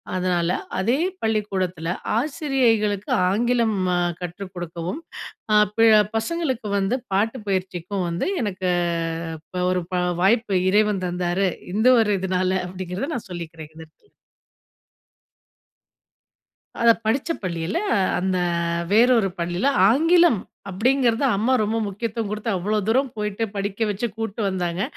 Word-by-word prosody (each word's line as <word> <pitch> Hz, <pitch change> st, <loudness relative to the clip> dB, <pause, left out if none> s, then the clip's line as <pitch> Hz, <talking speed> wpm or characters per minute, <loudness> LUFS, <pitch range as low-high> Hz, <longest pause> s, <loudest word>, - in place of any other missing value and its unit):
அதனால 180 Hz, -2 st, 0 dB, 0.3 s
அதே 230 Hz, +8 st, +2 dB, 0.2 s
பள்ளிக்கூடத்துல 190 Hz, -6 st, -1 dB, 0.3 s
ஆசிரியைகளுக்கு 235 Hz, -, +1 dB, 0.2 s
ஆங்கிலம் 230 Hz, +1 st, +1 dB, 0.2 s
அ -, -, +1 dB, 0.2 s
கற்றுக் 180 Hz, +2 st, -7 dB
கொடுக்கவும், 175 Hz, -, -5 dB, 0.5 s
அ -, -, +6 dB, 0.2 s
பில 225 Hz, 0 st, +6 dB, 0.3 s
பசங்களுக்கு 260 Hz, -1 st, -2 dB
வந்து 200 Hz, +6 st, 0 dB, 0.2 s
பாட்டுப் 220 Hz, +3 st, 0 dB
பயிற்சிக்கும் 185 Hz, 0 st, -2 dB
வந்து 170 Hz, -, -2 dB, 0.2 s
எனக்கு 190 Hz, -2 st, -2 dB, 0.7 s
இப்ப 180 Hz, +3 st, -5 dB
ஒரு 180 Hz, -1 st, 0 dB
ப -, -, +1 dB, 0.3 s
வாய்ப்பு 220 Hz, 0 st, +2 dB, 0.2 s
இறைவன் 210 Hz, -2 st, +2 dB
தந்தாரு. 180 Hz, +2 st, 0 dB, 0.2 s
இந்த 220 Hz, +5 st, +2 dB
ஒரு 210 Hz, -2 st, +1 dB
இதனால 185 Hz, 0 st, 0 dB
அப்டிங்கறத 185 Hz, -, -5 dB
நான் 220 Hz, -, -6 dB
சொல்லிக்கிறேன். 160 Hz, -2 st, -8 dB
இந்த 160 Hz, -, -10 dB
இடத்துல. 415 Hz, -, -33 dB, 2.7 s
அத 235 Hz, 0 st, +6 dB, 0.2 s
படிச்ச 265 Hz, +9 st, 0 dB
பள்ளில 170 Hz, -, -2 dB, 0.4 s
அந்த 185 Hz, 0 st, 0 dB, 0.5 s
வேற 230 Hz, +4 st, +6 dB
ஒரு 195 Hz, -, 0 dB
பள்ளில 175 Hz, +6 st, -1 dB, 0.2 s
ஆங்கிலம் 330 Hz, -, +4 dB, 0.3 s
அப்டிங்கறது 245 Hz, +5 st, +2 dB
அம்மா 225 Hz, +6 st, +1 dB
ரொம்ப 215 Hz, +2 st, -1 dB
முக்கியத்துவம் 220 Hz, +2 st, -3 dB
குடுத்து, 215 Hz, +2 st, -3 dB
அவ்ளோ 205 Hz, +4 st, -1 dB
தூரம் 260 Hz, +4 st, +2 dB
போயிட்டு 210 Hz, +1 st, -2 dB
படிக்க 200 Hz, +1 st, -3 dB
வச்சு 205 Hz, +4 st, -2 dB
கூட்டு 225 Hz, 0 st, -4 dB
வந்தாங்க. 180 Hz, -1 st, -2 dB
205 Hz, 120 wpm, -23 LUFS, 185-230 Hz, 2.7 s, அ